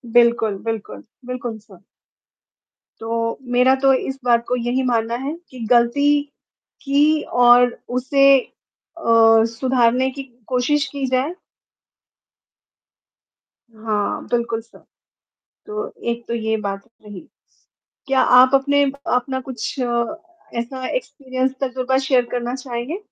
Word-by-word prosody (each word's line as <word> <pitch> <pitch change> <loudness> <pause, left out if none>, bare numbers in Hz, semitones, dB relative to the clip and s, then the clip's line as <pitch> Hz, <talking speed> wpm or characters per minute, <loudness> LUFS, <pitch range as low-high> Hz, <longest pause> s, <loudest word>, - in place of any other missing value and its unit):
बिल्कुल, 235 -4 +3
बिल्कुल, 225 -2 -5 0.2
बिल्कुल। 245 -2 -5
सर। 205 -4 -18 1.2
तो 230 0 -2 0.2
मेरा 255 +2 +5
तो 270 0 +6
इस 265 +1 -2
बात 235 -1 +3
को 250 - 0
यही 245 +2 -1
मानना 235 -2 0
है 295 +3 -3
कि 255 - -12
गलती 245 +4 +4 0.7
की 295 +2 +2 0.3
और 245 0 +6 0.2
उसे 275 +2 +4 0.7
अ, 335 - -10 0.4
सुधारने 250 +2 +1
की 275 +1 -7 0.2
कोशिश 265 +3 +1
की 280 -1 -2
जाए। 260 +5 0 2.4
हाँ, 215 -2 -2
बिल्कुल 235 -1 -1
सर। 230 +1 -21 0.8
तो 425 +1 -4 0.2
एक 235 0 -4
तो 235 - -2
ये 220 -1 -1
बात 200 +2 -5
रही। 205 -4 -10 0.9
क्या 270 -1 +3 0.2
आप 255 +1 +5
अपने 285 +1 +3 0.3
अपना 260 +1 -1
कुछ 260 +1 -6
अ, 235 0 -1 0.4
ऐसा 255 +2 -5
एक्सपीरियंस 260 - -3
तजुर्बा 260 0 0
शेयर 255 -3 +3
करना 245 0 -2
चाहेंगे? 255 +5 -5
250 Hz, 115 wpm, -20 LUFS, 235-265 Hz, 2.4 s, तो